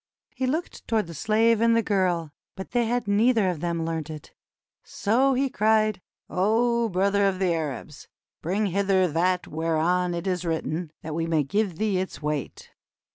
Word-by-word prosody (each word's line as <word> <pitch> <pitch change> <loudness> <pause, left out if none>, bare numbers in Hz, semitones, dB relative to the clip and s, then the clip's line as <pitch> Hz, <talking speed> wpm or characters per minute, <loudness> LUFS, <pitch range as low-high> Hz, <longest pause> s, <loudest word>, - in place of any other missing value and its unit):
He 260 0 -2
looked 315 +7 -3
toward 220 -3 +1
the 170 - -9
slave 220 +5 +2
and 230 0 +4
the 230 - +2
girl, 180 -6 0 0.2
but 190 - -8
they 240 -1 +1
had 245 -1 -1
neither 215 +1 +3
of 175 -4 -3
them 170 0 -2
learnt 160 -2 -3
it. 155 -2 -9 0.5
So 260 +6 +1
he 270 +2 +1
cried: 215 -4 +2 0.3
"O 230 +4 +1
brother 200 +2 +2
of 190 -1 0
the 185 -2 +1
Arabs! 150 -2 -5 0.3
Bring 195 +6 0
hither 195 -1 +2
that 180 +3 0
whereon 165 +3 0
it 170 +2 -4
is 180 -2 -1
written, 165 -1 -2
that 155 -1 -5
we 165 +1 -1
may 160 -2 +2
give 190 +4 -1
thee 210 -3 0
its 185 - -4
weight." 150 -2 -4
185 Hz, 175 wpm, -25 LUFS, 165-220 Hz, 0.5 s, and